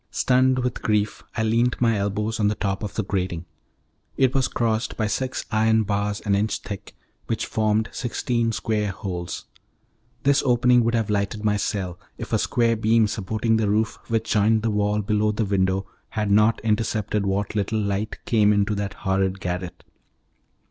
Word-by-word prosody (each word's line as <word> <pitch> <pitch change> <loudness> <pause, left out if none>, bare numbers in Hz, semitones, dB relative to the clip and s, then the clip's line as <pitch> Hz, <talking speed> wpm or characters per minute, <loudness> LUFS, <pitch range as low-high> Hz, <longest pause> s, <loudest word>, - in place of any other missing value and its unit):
Stunned 130 0 +3
with 125 -2 -2
grief, 105 -1 0 0.2
I 110 - +1
leant 115 +3 +1
my 115 -2 +3
elbows 105 +2 -1
on 105 - +3
the 105 - +1
top 100 -2 -2
of 105 - -5
the 110 - 0
grating. 90 -3 -2 0.7
It 130 -1 +3
was 135 -2 +2
crossed, 115 0 -1
by 110 - +1
six 130 +6 -2
iron 110 0 +3
bars 100 +1 -1
an 100 - 0
inch 105 +2 +1
thick, 100 -2 -8 0.3
which - - -1
formed 110 0 +1
sixteen 120 -1 -1
square 110 -1 -1
holes. 90 -2 -5 0.8
This 140 0 +4
opening 125 -1 +4
would 115 +1 +1
have 110 -2 0
lighted 105 +1 -1
my 105 -1 +3
cell, 95 -4 -2 0.2
if - - -6
a - - +3
square 115 -1 +2
beam 110 +1 +3
supporting 110 +2 0
the 110 -2 +1
roof 110 +1 0
which 115 -1 -1
joined 110 +1 +3
the 115 - +1
wall 105 0 +1
below 105 +1 +1
the 105 +1 -1
window 95 -1 +1 0.2
had 105 -2 -1
not 105 +2 +4
intercepted 105 -2 0
what 100 +1 -1
little 105 +1 0
light 100 +1 -2
came 105 -3 +4
into 105 +1 +2
that 100 0 -3
horrid 95 0 +1
garret. 90 0 -4
105 Hz, 175 wpm, -24 LUFS, 100-115 Hz, 0.8 s, This